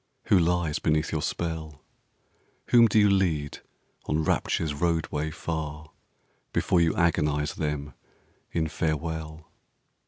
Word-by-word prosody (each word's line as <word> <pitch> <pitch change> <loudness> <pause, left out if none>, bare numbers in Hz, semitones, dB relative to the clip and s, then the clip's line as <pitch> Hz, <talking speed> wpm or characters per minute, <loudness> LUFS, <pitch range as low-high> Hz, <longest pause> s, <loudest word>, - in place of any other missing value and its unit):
Who 95 - +6
lies 85 -2 +1
beneath 75 -1 +1
your 80 - -1
spell? 80 -2 -4 0.9
Whom 120 -1 +7
do 110 - +1
you 105 -1 +6
lead 85 -7 +1 0.5
on 80 +1 0
Rapture's 75 0 0
roadway, 80 -1 -1
far, 80 -1 -5 0.6
Before 90 - +2
you 80 -1 +2
agonise 75 -3 +1
them 75 -2 -3 0.6
in 80 -1 0
farewell? 80 0 -3
80 Hz, 115 wpm, -27 LUFS, 75-85 Hz, 0.9 s, Whom